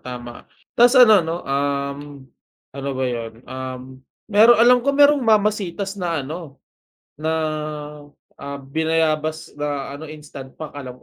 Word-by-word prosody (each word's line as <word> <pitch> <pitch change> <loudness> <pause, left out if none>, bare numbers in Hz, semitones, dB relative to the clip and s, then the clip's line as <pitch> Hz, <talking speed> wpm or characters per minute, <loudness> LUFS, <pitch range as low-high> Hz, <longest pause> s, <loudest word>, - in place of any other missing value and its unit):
tama. 120 -1 -9 0.2
Ta's 245 +2 +5
ano 220 -6 +8
'no, 165 0 -3
um, 140 0 -1 0.7
ano 140 0 -5
ba 130 - -1
yun? 115 -2 -3
Um, 130 0 -8 0.2
meron 220 +3 +6
alam 245 +2 +6
ko 275 - -3
merong 290 0 +6
mamasitas 205 -3 0
na 165 -6 -2
ano, 155 -1 -8 0.6
na, 160 +1 -1 1.1
ah, 140 0 -6
binayabas 160 +1 -1
na 145 -2 -3
ano, 150 +3 -8
instant 145 -3 -11
pack 155 -1 -8
alam 130 -3 -8
155 Hz, 130 wpm, -21 LUFS, 135-200 Hz, 1.1 s, ano